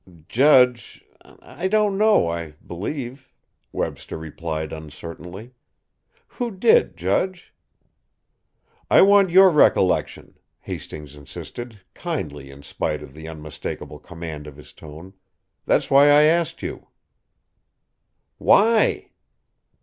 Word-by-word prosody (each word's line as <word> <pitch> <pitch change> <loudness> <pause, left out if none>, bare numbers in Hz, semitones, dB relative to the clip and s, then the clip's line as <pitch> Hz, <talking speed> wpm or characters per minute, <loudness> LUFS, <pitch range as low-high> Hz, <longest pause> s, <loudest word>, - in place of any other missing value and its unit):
"Judge 125 -2 +3 0.4
I 185 - -5
don't 210 0 +1
know, 210 - +3
I 85 -2 -5
believe," 130 - -6 0.4
Webster - - -5
replied 80 0 -6
uncertainly. 85 - -10 0.7
"Who 245 -2 -5
did, 445 - +2
judge?" 185 -1 -2 1.4
"I - - +6
want 200 -1 +5
your 190 +2 +7
recollection," 95 - +1 0.2
Hastings 75 -2 -8
insisted, 105 - -10
kindly 75 - -5
in 70 +1 -14
spite 75 +1 -4
of 70 - -13
the 80 +1 -10
unmistakable 75 -2 -8
command 80 -3 -9
of 75 -1 -12
his 75 - -15
tone. 80 +5 -12 0.5
"That's - - +1
why 140 +1 +7
I 145 +1 +6
asked 165 +1 +1
you." - - -7 1.5
"Why?" 220 +2 +3
105 Hz, 105 wpm, -22 LUFS, -, 1.5 s, your